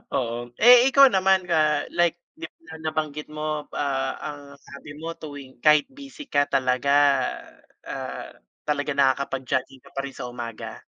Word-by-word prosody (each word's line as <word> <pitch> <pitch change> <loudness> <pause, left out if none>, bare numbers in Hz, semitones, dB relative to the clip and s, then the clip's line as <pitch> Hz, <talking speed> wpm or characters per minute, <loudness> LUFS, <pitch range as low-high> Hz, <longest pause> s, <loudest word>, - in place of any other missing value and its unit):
Oo, 120 -3 -1 0.3
eh, 245 +2 +8
ikaw 275 0 +7
naman, 190 -3 +2
ah, 155 -3 +2
like 175 0 +1 0.2
na 330 - -11
nabanggit 150 -1 -3
mo, 150 0 -4
ah, 135 -2 -1
ang 145 -1 -6 0.2
sabi 140 +1 -12
mo 165 +2 -5
tuwing 145 -4 -10
kahit 150 - +5
busy 280 +1 -12
ka 145 0 +3
talaga, 130 0 0 0.9
ah, - - -6 0.4
talaga 150 0 -1
nakakapag-jogging 135 -1 0
ka - - -15
pa 135 - -2
rin 135 - -8
sa 125 - -5
umaga. 120 -2 -7
150 Hz, 145 wpm, -24 LUFS, 135-170 Hz, 0.9 s, eh